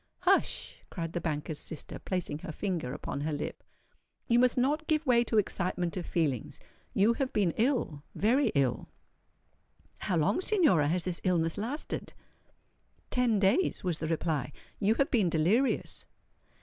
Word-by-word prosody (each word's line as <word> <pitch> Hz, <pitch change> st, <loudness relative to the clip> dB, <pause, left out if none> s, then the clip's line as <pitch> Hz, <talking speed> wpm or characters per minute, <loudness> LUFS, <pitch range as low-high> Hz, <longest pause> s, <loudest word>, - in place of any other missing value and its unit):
"Hush!" -, -, +1 dB
cried 165 Hz, -1 st, -5 dB
the 175 Hz, -, -2 dB
banker's 150 Hz, -1 st, -3 dB
sister, 160 Hz, -, -7 dB
placing 180 Hz, -5 st, -3 dB
her 160 Hz, -, -6 dB
finger 170 Hz, -5 st, -3 dB
upon 140 Hz, -, -4 dB
her 155 Hz, +2 st, -1 dB
lip: 150 Hz, 0 st, -4 dB, 0.6 s
"you 235 Hz, 0 st, +4 dB
must 250 Hz, 0 st, +3 dB
not 295 Hz, +5 st, +1 dB
give 310 Hz, 0 st, +1 dB
way 240 Hz, -3 st, +4 dB
to 225 Hz, -, 0 dB
excitement 180 Hz, -3 st, 0 dB
of 180 Hz, -, -4 dB
feelings. 145 Hz, -8 st, -1 dB, 0.4 s
You 210 Hz, +4 st, +4 dB
have 260 Hz, +2 st, -2 dB
been 195 Hz, -5 st, +2 dB
ill—very 235 Hz, -, +1 dB
ill." 135 Hz, -3 st, +1 dB, 1.1 s
"How 180 Hz, -, -1 dB
long, 160 Hz, -, +2 dB
Signora, 320 Hz, -, +3 dB
has 175 Hz, +3 st, +1 dB
this 180 Hz, -1 st, -3 dB
illness 165 Hz, -3 st, +1 dB
lasted?" 250 Hz, +9 st, -4 dB, 1.0 s
"Ten 245 Hz, -4 st, +2 dB
days," 200 Hz, -, +2 dB
was 175 Hz, -4 st, -1 dB
the 160 Hz, -, -2 dB
reply. 160 Hz, -4 st, -1 dB, 0.3 s
"You 215 Hz, +2 st, +3 dB
have 275 Hz, -, +1 dB
been 210 Hz, -8 st, +3 dB
delirious." 185 Hz, -, +1 dB
185 Hz, 150 wpm, -30 LUFS, 160-240 Hz, 1.1 s, you